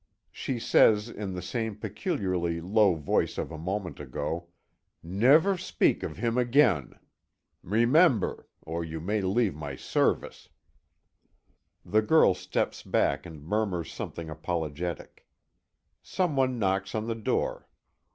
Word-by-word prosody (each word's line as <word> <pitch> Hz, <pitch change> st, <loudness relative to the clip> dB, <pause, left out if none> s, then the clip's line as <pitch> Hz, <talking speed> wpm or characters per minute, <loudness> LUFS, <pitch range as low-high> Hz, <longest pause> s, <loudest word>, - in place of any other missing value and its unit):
She 130 Hz, -, -4 dB
says, 110 Hz, -1 st, +4 dB
in 100 Hz, -4 st, -5 dB
the 90 Hz, -, -5 dB
same 110 Hz, +2 st, -3 dB
peculiarly 95 Hz, -, -2 dB
low 100 Hz, +2 st, +3 dB
voice 75 Hz, -3 st, 0 dB
of -, -, -3 dB
a 80 Hz, -, -6 dB
moment 90 Hz, +2 st, -4 dB
ago: 75 Hz, +5 st, -4 dB, 0.6 s
"Never 135 Hz, -, +4 dB
speak -, -, +1 dB
of 75 Hz, -, -5 dB
him 115 Hz, +3 st, 0 dB
again. 120 Hz, -, +2 dB, 0.6 s
Remember! 120 Hz, -, +3 dB, 0.2 s
or 85 Hz, +1 st, -4 dB
you 80 Hz, 0 st, -5 dB
leave 100 Hz, +4 st, 0 dB
my 75 Hz, -2 st, -6 dB
service." -, -, -1 dB, 1.4 s
The 110 Hz, +1 st, +3 dB
girl 110 Hz, -3 st, +5 dB
steps -, -, -2 dB
back -, -, 0 dB
and 80 Hz, -4 st, -11 dB
murmurs 95 Hz, -1 st, -2 dB
something 85 Hz, -1 st, -6 dB
apologetic. 80 Hz, +1 st, -5 dB, 0.7 s
Some 180 Hz, -6 st, -1 dB
one 130 Hz, -2 st, +1 dB
knocks 95 Hz, -1 st, -1 dB
on 110 Hz, 0 st, -1 dB
the 115 Hz, -, -1 dB
door. 110 Hz, -2 st, -2 dB
100 Hz, 120 wpm, -28 LUFS, 85-115 Hz, 1.4 s, girl